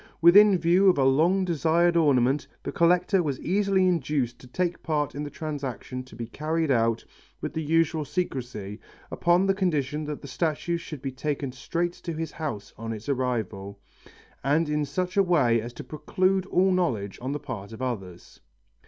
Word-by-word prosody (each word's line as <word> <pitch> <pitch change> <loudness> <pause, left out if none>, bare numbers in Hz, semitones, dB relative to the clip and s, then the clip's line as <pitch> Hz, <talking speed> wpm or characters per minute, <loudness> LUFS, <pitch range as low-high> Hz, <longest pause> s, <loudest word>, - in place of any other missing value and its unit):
Within 195 +4 +7
view 175 +3 +4
of 180 - +3
a 135 - +3
long 165 +9 +3
desired 170 +1 +2
ornament, 140 -3 +3 0.2
the - - -3
collector 180 +3 +3
was 145 -6 -2
easily 195 0 +2
induced 145 -8 0
to 125 - -14
take 175 +6 -2
part 150 -3 -1
in 145 - -5
the 150 - -4
transaction 135 -5 -5
to 130 - -14
be 115 +1 -5
carried 155 +5 -1
on 115 -2 +2 0.4
with - - -5
the 160 - -2
usual 160 0 +1
secrecy, 125 - -4 0.3
upon 175 +2 +3
the 195 - +3
condition 155 -6 -1
that 150 -1 -5
the - - -7
statue 160 +5 -1
should 155 -4 -9
be 135 - -2
taken 140 0 -3
straight 170 +7 -2
to 170 - -6
his 160 0 -4
house 140 -11 -5
on 115 0 -4
its 110 +3 -9
arrival, 110 -7 -2 0.6
and 150 +4 +2
in 150 0 0
such 180 +7 -3
a - - +7
way 145 - +3
as 120 +2 -7
to - - -8
preclude 185 +4 0
all 190 0 +3
knowledge 120 - -1
on 130 +2 -3
the 145 - -2
part 115 -8 -7
of 110 - -9
others. 95 -9 -6
150 Hz, 180 wpm, -26 LUFS, 130-175 Hz, 0.6 s, Within